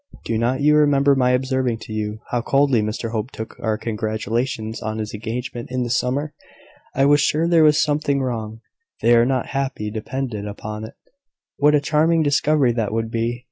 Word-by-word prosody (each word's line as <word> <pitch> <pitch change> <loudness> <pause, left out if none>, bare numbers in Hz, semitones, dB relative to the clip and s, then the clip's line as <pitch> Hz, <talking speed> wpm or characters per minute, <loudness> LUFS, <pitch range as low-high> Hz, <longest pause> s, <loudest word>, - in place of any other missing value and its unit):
Do 115 - -1
not 125 +4 0
you 150 +1 +4
remember 140 -1 +4
my 130 -2 +2
observing 130 -2 0
to 110 - -8
you, 105 0 -3
how 120 - 0
coldly 135 -2 +2
Mr 110 +2 -3
Hope 110 +1 -3
took 110 -4 -8
our 110 -1 -1
congratulations 110 +1 -3
on 110 0 -3
his 110 -1 -4
engagement 115 +2 -5
in 130 0 -1
the 120 - -3
summer? 135 +4 -1 0.6
I 135 - +3
was 145 +1 +5
sure 160 +3 +1
there 170 -2 +5
was 150 -1 +5
something 145 -2 0
wrong. 115 -4 -4 0.4
They 120 +1 +5
are 115 +1 +4
not 130 -2 -1
happy, 135 -6 -3
depend 125 +3 -4
upon 105 +1 -6
it." 110 - -12 0.6
"What 150 +1 +4
a - - +4
charming 160 +3 +2
discovery 145 -2 +2
that 115 -3 -2
would 115 0 -2
be!" 115 +1 -1
125 Hz, 185 wpm, -21 LUFS, 110-140 Hz, 0.6 s, was